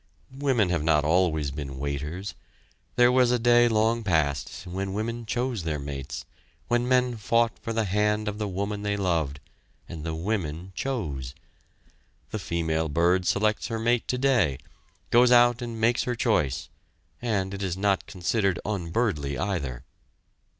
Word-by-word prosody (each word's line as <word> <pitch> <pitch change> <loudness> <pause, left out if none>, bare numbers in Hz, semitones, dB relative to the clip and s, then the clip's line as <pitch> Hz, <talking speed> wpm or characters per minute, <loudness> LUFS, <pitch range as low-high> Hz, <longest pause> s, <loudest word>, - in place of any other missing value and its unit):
Women 130 -8 +2
have 85 -3 0
not 75 -2 +3
always 80 -3 +2
been 70 -2 -6
"waiters." 75 +8 -4 0.6
There 125 0 +5
was 125 -1 +4
a 125 - +3
day 120 0 +5
long 115 +1 +2
past, 80 -3 0
when 95 +2 -4
women 115 +2 -3
chose 120 -2 -1
their 80 -2 -2
mates, 70 -1 -6 0.4
when 120 +1 +1
men 125 -2 +2
fought 115 +1 +1
for 115 - -5
the 115 0 +1
hand 105 +2 +1
of 105 0 -3
the 105 - -1
woman 100 +2 -3
they 105 0 -1
loved, 80 -7 0 0.5
and 80 -2 -7
the 80 -1 -3
women 90 -1 -3
chose. 75 - -3 1.0
The 110 - -3
female 80 -3 -1
bird 85 +4 +2
selects 105 +1 +1
her 115 - -3
mate 120 +1 +1
today, 125 - +2 0.5
goes 120 +1 +6
out 120 0 +5
and 115 -2 -5
makes 115 +2 +3
her 125 - -1
choice, 75 - 0 0.5
and, 100 -5 -1
it 100 - -5
is 95 -2 -2
not 100 -1 +1
considered 100 -1 0
unbirdly 85 - -1
either. 70 -11 -3
100 Hz, 150 wpm, -26 LUFS, 80-115 Hz, 1.0 s, goes